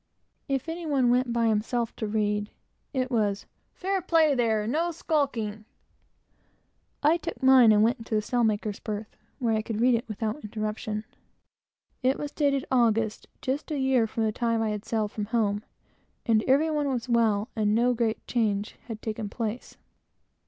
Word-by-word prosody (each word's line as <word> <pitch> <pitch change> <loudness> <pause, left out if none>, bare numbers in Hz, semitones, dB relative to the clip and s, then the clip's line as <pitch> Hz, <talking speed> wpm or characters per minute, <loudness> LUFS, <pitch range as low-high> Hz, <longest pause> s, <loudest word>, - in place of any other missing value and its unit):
If 270 -1 -1
any 330 0 -4
one 265 -5 +3
went 250 0 +2
by 235 0 +1
himself 225 +2 0
to 220 - -2
read, 210 0 0 0.4
it 260 -2 -1
was 205 -4 0 0.3
"Fair 385 +1 -1
play, 320 -4 +3
there; 225 -4 +1
and 220 - -2
no 330 +4 +1
skulking!" 270 -10 -1 1.4
I 310 +3 +5
took 315 - -7
mine 260 -4 +7
and 210 0 +5
went 230 +2 +2
into 225 -1 -4
the 215 - +2
sailmaker's 215 -3 0
berth, 210 0 -5 0.2
where 235 -4 0
I 215 - +1
could 220 0 -4
read 250 +2 +4
it 235 +2 0
without 220 +5 -3
interruption. 215 0 -4 1.0
It 260 +1 +2
was 290 -1 -5
dated 280 -3 +1
August, 225 -3 +2 0.2
just 275 +5 -2
a 300 - -2
year 265 -4 +2
from 225 +1 -2
the 220 - +1
time 230 +1 0
I 220 - 0
had 210 +1 -5
sailed 220 -2 -1
from 210 - -3
home; 210 -2 0 0.6
and 220 -2 +3
every 290 +5 +4
one 295 -2 0
was 250 -2 -2
well, 225 -2 +2
and 210 -1 +2
no 245 +2 +3
great 230 -2 -1
change 215 -3 -1
had 225 -3 -7
taken 215 -1 -3
place. 225 +2 -5
230 Hz, 175 wpm, -27 LUFS, 215-265 Hz, 1.4 s, mine